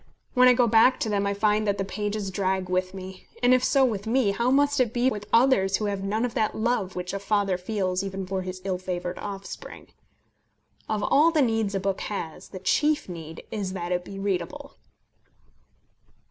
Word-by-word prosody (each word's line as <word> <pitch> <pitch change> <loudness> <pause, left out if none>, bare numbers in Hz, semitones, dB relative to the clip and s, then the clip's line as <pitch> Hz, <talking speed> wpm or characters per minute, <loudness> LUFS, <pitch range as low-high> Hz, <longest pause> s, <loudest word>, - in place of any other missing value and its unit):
When 250 0 +6
I 250 - +7
go 245 0 +4
back 230 +3 +5
to 220 - 0
them 200 -1 0
I 200 - -1
find 210 +1 +1
that 200 0 +1
the 195 - -2
pages 205 0 -3
drag 190 -1 -1
with 185 +1 -1
me; 190 0 -9 0.2
and 245 +1 +6
if 255 0 +3
so 270 0 +4
with 215 -4 -2
me, 235 -3 +2
how 235 +5 0
must 285 +1 +3
it 240 -3 +2
be 250 +2 +3
with 210 -2 -6
others 230 -6 +4
who 215 - -3
have 200 -1 -2
none 215 +4 0
of 240 - -4
that 215 - 0
love 220 -4 0
which 180 +1 -4
a 200 - -2
father 200 -1 +1
feels 185 0 -2
even 195 -1 -4
for 190 0 -2
his 185 0 -7
ill 185 -2 -1
favoured 180 -1 -4
offspring. 195 -1 -8 1.0
Of 215 -1 -1
all 300 +8 +5
the 315 -3 +3
needs 225 -4 0
a - - +1
book 195 0 -2
has 165 -6 -5
the 190 - -8
chief 295 +11 +1
need 165 -2 -8
is 200 -4 -3
that 175 -2 -4
it 180 0 0
be 195 +2 -9
readable. 195 +9 -3
200 Hz, 205 wpm, -26 LUFS, 185-230 Hz, 1.0 s, I